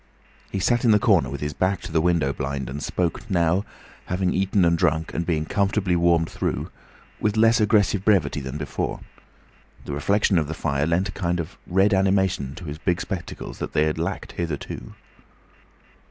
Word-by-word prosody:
He - - -2
sat 120 +5 +2
in 120 - +4
the 105 - +7
corner - - +3
with 70 0 -6
his 75 0 -2
back 95 +3 0
to - - -8
the 80 0 +2
window 85 -5 +2
blind 65 -2 -4
and 70 +2 -5
spoke 90 +8 -2
now, 90 0 +2 0.4
having 90 0 0
eaten 95 0 +2
and 85 0 +4
drunk 80 -1 0
and 85 - -2
being 80 -3 0
comfortably 100 0 +1
warmed 85 -1 +3
through, - - -3 0.5
with 105 0 0
less 115 +1 +5
aggressive 105 -2 +3
brevity 90 -9 +2
than 65 +2 -5
before. 75 -1 -3 0.8
The - - -5
reflection 100 +4 +2
of 75 - -1
the 80 - -4
fire 70 -2 0
lent 85 +3 +1
a - - -4
kind 90 -2 -1
of 85 +4 -5
red 95 +3 +3
animation 95 -8 +1
to 90 - -9
his 75 0 -6
big 85 0 0
spectacles 95 -4 -6
they 75 - 0
had 80 +1 -1
lacked 90 +4 -3
hitherto. 75 -7 -5
85 Hz, 185 wpm, -24 LUFS, 75-95 Hz, 0.8 s, the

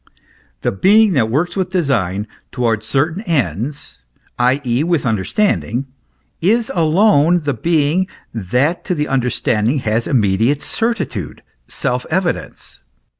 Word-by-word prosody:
The - - 0
being 205 - +4
that 115 -7 +2
works 155 +9 -1
with 190 -2 -1
design, 115 - 0 0.3
towards 115 -3 -1
certain 155 - 0
ends, 140 - -2 0.4
i.e. 125 +1 +1
with 170 -4 0
understanding, 120 - 0 0.6
is 220 +6 +2
alone 170 0 +3
the 145 -1 0
being 165 +6 +1 0.3
that 125 - 0
to 180 - -1
the 150 -1 -1
understanding 125 -1 0
has 110 +2 0
immediate 115 +4 +1
certitude, 170 - -3 0.2
self 125 0 -2
evidence. 175 - -3
140 Hz, 115 wpm, -17 LUFS, 115-175 Hz, 0.6 s, being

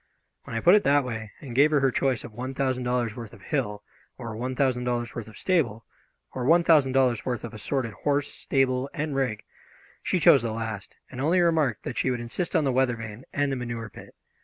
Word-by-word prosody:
When - - -7
I 115 - -1
put 175 - +6
it 210 - +5
that 145 0 +4
way, 110 -4 -5
and 130 -5 -8
gave 140 +5 +5
her 150 -2 +3
her 135 -1 +2
choice 130 -2 0
of 110 - -10
one 130 +4 -5
thousand 130 -2 -1
dollars' 120 -2 0
worth 115 -3 -8
of 110 - -15
hill, 105 -8 -2 0.3
or 115 -2 -6
one 125 +3 -3
thousand 125 -2 +1
dollars' 120 -2 -2
worth 115 -2 -6
of 110 - -13
stable, 135 - 0 0.5
or 130 - -3
one 165 +6 +5
thousand 150 -6 +4
dollars' 130 -4 +2
worth 125 -2 -3
of 120 - -7
assorted 115 +1 -2
horse, 145 +4 -1
stable, 130 0 0
and 150 -1 -2
rig, 125 -6 -1 0.6
she - - 0
chose - - +6
the 115 -2 -2
last, 110 -3 -5 0.2
and 130 - -6
only 165 +6 +3
remarked 160 - +2
that 120 - -4
she - - +1
would 125 -1 -1
insist 120 +11 -4
on 160 - +4
the 135 - +1
weather 130 -1 +2
vane 115 +1 -8
and 145 -1 0
the - - 0
manure 120 -3 -5
pit. - - -13
125 Hz, 230 wpm, -26 LUFS, 115-140 Hz, 0.6 s, put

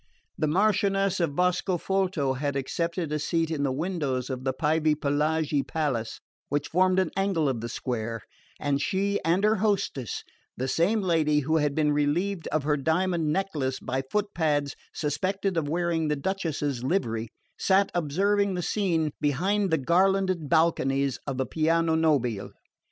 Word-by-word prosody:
The 155 - 0
Marchioness 195 +2 +2
of 160 -5 0
Boscofolto 180 -3 0
had 140 +1 -2
accepted 165 +4 -2
a 150 - 0
seat 165 +2 0
in 155 -3 -1
the 140 -2 +1
windows 140 -4 -2
of 130 0 -4
the 130 - +1
Pievepelaghi 150 0 +1
palace, 135 -8 -2 0.3
which 145 +1 -1
formed 185 +2 +3
an 190 - +2
angle 195 -5 +1
of 125 -4 -1
the 120 - -4
square, 115 -3 -3 0.4
and 140 -1 0
she 200 +1 0
and 170 +5 +2
her 215 +1 +4
hostess 195 - -1 0.3
the 130 - -2
same 195 - +2
lady 155 -4 +2
who 155 +4 +1
had 150 -2 +1
been 150 -1 +2
relieved 165 +6 0
of 155 -1 -1
her 150 0 +1
diamond 160 +2 +1
necklace 150 -8 -1
by 130 +1 -2
footpads 155 -4 -1 0.2
suspected 185 +6 -1
of 155 -3 -1
wearing 170 -1 0
the 150 - +1
Duchess's 145 -6 -2
livery 115 - -1 0.3
sat 195 +1 +3
observing 195 +5 +1
the 180 - -2
scene 165 -7 0
behind 190 +8 +1
the 160 - +2
garlanded 185 +1 +2
balconies 140 -5 +2
of 135 -2 -2
the 130 - 0
piano 165 +2 +1
nobile. 140 -10 +1
160 Hz, 150 wpm, -27 LUFS, 140-185 Hz, 0.4 s, her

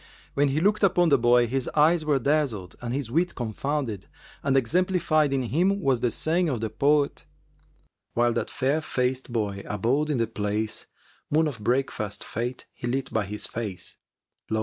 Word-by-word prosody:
When 145 +1 +3
he 140 +2 +1
looked 205 +5 +2
upon 175 -3 +4
the 140 - +5
boy, 120 0 +5
his 130 +2 -1
eyes 155 +2 +4
were 150 -2 +2
dazzled 135 -9 0
and 120 -1 -4
his 130 -3 -3
wit 175 +5 +1
confounded, 120 -2 -3 0.3
and 135 -1 +2
exemplified 155 +1 +2
in 135 -1 +1
him 180 - +1
was 135 -8 +2
the 120 - +1
saying 165 +8 +1
of 125 -5 -1
the 110 -1 -3
poet, 140 +5 +1 0.9
"While 120 0 +3
that 120 - -2
fair 140 +4 0
faced 130 -3 -1
boy 105 -4 -2
abode 125 +9 0
in 145 - +1
the 115 - +2
place, 105 0 -3 0.2
* - - -33
Moon 155 +2 +3
of 135 -7 -5
breakfast 115 -4 -1
fкte 120 +3 -4
he 120 - -6
lit 135 +2 -2
by 110 -2 +1
his 105 +1 -3
face,[FN#381] 105 -6 -8
Lo! 110 - 0
130 Hz, 180 wpm, -26 LUFS, 115-150 Hz, 0.9 s, the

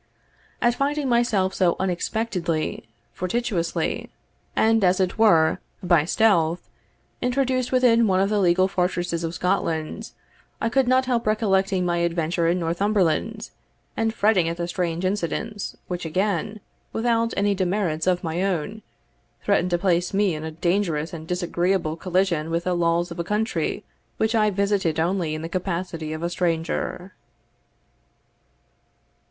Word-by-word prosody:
At 240 - +4
finding 285 +2 -1
myself 235 -6 +2
so 180 -3 +2
unexpectedly, 180 - -2 0.3
fortuitously, 185 -2 -2 0.5
and, 225 -1 +3
as 180 0 +3
it 185 +3 0
were, 165 -8 +4 0.2
by 170 -4 +3
stealth, 175 -4 +2 0.5
introduced 255 0 0
within 240 -3 +4
one 185 -1 +2
of 195 - +3
the 210 - +2
legal 185 0 +3
fortresses 180 -2 -1
of 165 +1 -3
Scotland, 180 +2 -1 0.5
I 225 - 0
could 265 +1 +2
not 260 +1 +3
help 240 -3 0
recollecting 195 -3 +1
my 175 -1 0
adventure 170 0 0
in 175 +2 +2
Northumberland, 195 +4 0 0.4
and 225 0 0
fretting 205 -6 +2
at 170 - -4
the 170 0 -2
strange 175 0 -2
incidents 205 +2 -3
which 180 -1 -4
again, 195 +4 -1 0.3
without 230 0 +1
any 205 0 +2
demerits 185 -4 -1
of 180 0 +2
my 165 +1 -2
own, 195 +3 -2 0.6
threatened 200 -3 +2
to 175 - +1
place 180 0 0
me 200 -3 +2
in 155 0 -5
a 160 - -4
dangerous 170 -1 -1
and 160 -1 -7
disagreeable 175 -1 0
collision 180 -3 0
with 170 +1 -1
the 180 - 0
laws 170 0 +1
of 170 - -7
a - - 0
country 210 +5 -1 0.3
which 220 +1 +1
I 215 -2 +3
visited 200 -5 0
only 170 -2 0
in 155 - -6
the - - -3
capacity 170 -3 -3
of 155 +1 -5
a 170 - 0
stranger. 175 +2 -2
185 Hz, 145 wpm, -24 LUFS, 170-215 Hz, 0.6 s, At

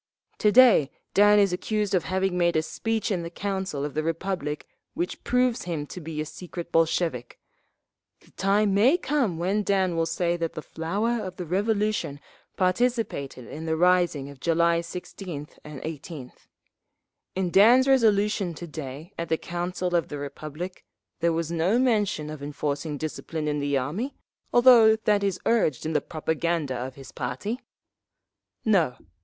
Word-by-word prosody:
"To 210 - +4
day 225 - +7 0.2
Dan 205 +1 +6
is 200 -3 +4
accused 210 +2 -1
of 180 -4 +2
having 190 0 0
made 170 -1 +2
a 155 - +2
speech 225 +5 -2
in 180 -3 0
the 170 - -5
Council 190 -6 -3
of 145 - -5
the 155 - 0
Republic 165 -2 -3 0.3
which 175 - -3
proves 250 -1 +1
him 160 -4 -3
to 180 - -9
be 155 -1 -6
a 155 - -1
secret 175 +1 -8
Bolshevik…. 165 -6 0 0.8
The - - -23
time 200 +1 +2
may 240 - +5
come 265 - 0
when 190 +5 0
Dan 190 -3 +1
will 165 0 +1
say 170 +1 0
that 165 -1 -2
the 155 - -6
flower 210 +8 -2
of 185 -1 -6
the 180 - -5
Revolution 205 -4 0 0.4
participated 185 - 0
in 160 +5 -7
the 160 0 0
rising 175 -5 +3
of 140 - -14
July 170 +2 +2
16th 170 -2 -7
and 150 -2 -8
18th…. 150 -3 -8 0.9
In 185 -2 -1
Dan's 240 +8 +6
resolution 210 -7 +3
to 175 - -7
day 155 +2 -8
at 170 - -3
the 160 - +2
Council 175 +1 -3
of 170 - +1
the 145 - -6
Republic 155 +5 -7 0.4
there 170 0 +2
was 165 0 -2
no 170 +7 +2
mention 210 -11 +1
of 155 -2 -8
enforcing 145 +1 -3
discipline 155 +1 -4
in 150 0 0
the 145 -1 0
army, 175 - -3 0.4
although 240 -3 +7
that 210 -2 +1
is 195 -2 0
urged 160 - +2
in 160 - -1
the - - +2
propaganda 160 -2 -1
of 130 +1 -5
his 135 -1 -11
party…. 135 - -4 1.1
"No. 180 - +3
175 Hz, 160 wpm, -26 LUFS, 155-205 Hz, 1.1 s, day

